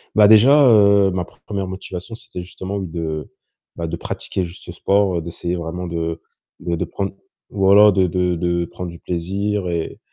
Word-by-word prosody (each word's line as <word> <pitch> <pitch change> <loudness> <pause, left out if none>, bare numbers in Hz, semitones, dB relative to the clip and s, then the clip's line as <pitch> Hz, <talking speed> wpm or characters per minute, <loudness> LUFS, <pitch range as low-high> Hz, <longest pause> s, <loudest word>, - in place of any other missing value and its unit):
Bah, 105 -1 +7
déjà, 110 +5 +7 0.2
heu, 100 -3 +5
ma 90 -1 -2
pre - - -23
1re 100 -2 -3
motivation, 95 +3 -7
c'était 115 -5 -8
justement 95 +2 -6
de 80 -4 -4 0.5
bah, 85 - -4
de - - -3
pratiquer 95 - -4
juste 85 0 -9
ce - - -8
sport, 100 -3 +1
d'essayer 85 +2 -4
vraiment 90 +1 -5
de 85 -1 -3 0.4
bah, 85 - -2
de 80 - -2
prendre 100 -1 -4 0.4
voilà, 100 +2 +6
de 95 -1 +2
de 90 0 0
de 85 0 0
prendre 90 +1 -7
du 85 - -12
plaisir 95 +3 -2
et 85 -1 -3
90 Hz, 180 wpm, -20 LUFS, 85-100 Hz, 0.5 s, Bah